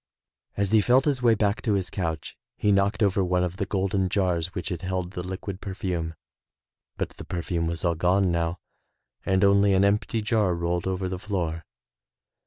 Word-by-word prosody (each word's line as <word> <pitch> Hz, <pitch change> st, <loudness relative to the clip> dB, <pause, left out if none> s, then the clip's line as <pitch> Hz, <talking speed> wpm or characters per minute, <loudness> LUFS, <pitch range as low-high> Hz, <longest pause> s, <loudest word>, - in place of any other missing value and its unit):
As 100 Hz, -1 st, 0 dB
he 110 Hz, -1 st, +6 dB
felt 125 Hz, +5 st, +4 dB
his 140 Hz, -4 st, +1 dB
way 115 Hz, -2 st, +5 dB
back 105 Hz, 0 st, 0 dB
to 110 Hz, -, +1 dB
his 95 Hz, -2 st, -1 dB
couch 80 Hz, -5 st, -3 dB, 0.2 s
he 105 Hz, -, +2 dB
knocked 100 Hz, +2 st, +2 dB
over 100 Hz, -1 st, +2 dB
one 90 Hz, 0 st, +1 dB
of 90 Hz, +1 st, -3 dB
the 100 Hz, -, -2 dB
golden 95 Hz, -1 st, 0 dB
jars 90 Hz, -2 st, 0 dB
which 90 Hz, -4 st, -3 dB
had 85 Hz, -2 st, -4 dB
held 90 Hz, -1 st, -3 dB
the 90 Hz, -, -5 dB
liquid 95 Hz, +1 st, -6 dB
perfume, 90 Hz, -4 st, -3 dB, 0.8 s
but -, -, -2 dB
the -, -, -7 dB
perfume 85 Hz, -1 st, -2 dB
was 85 Hz, +1 st, -2 dB
all 85 Hz, -, +3 dB
gone 90 Hz, +3 st, +2 dB
now 85 Hz, 0 st, -1 dB, 0.7 s
and 95 Hz, 0 st, +3 dB
only 100 Hz, 0 st, +5 dB
an 95 Hz, +1 st, +4 dB
empty 105 Hz, +2 st, +1 dB
jar 105 Hz, -5 st, +2 dB
rolled 85 Hz, +1 st, -1 dB
over 95 Hz, 0 st, -1 dB
the 90 Hz, 0 st, -4 dB
floor. 90 Hz, -6 st, -3 dB
95 Hz, 190 wpm, -26 LUFS, 90-100 Hz, 0.8 s, he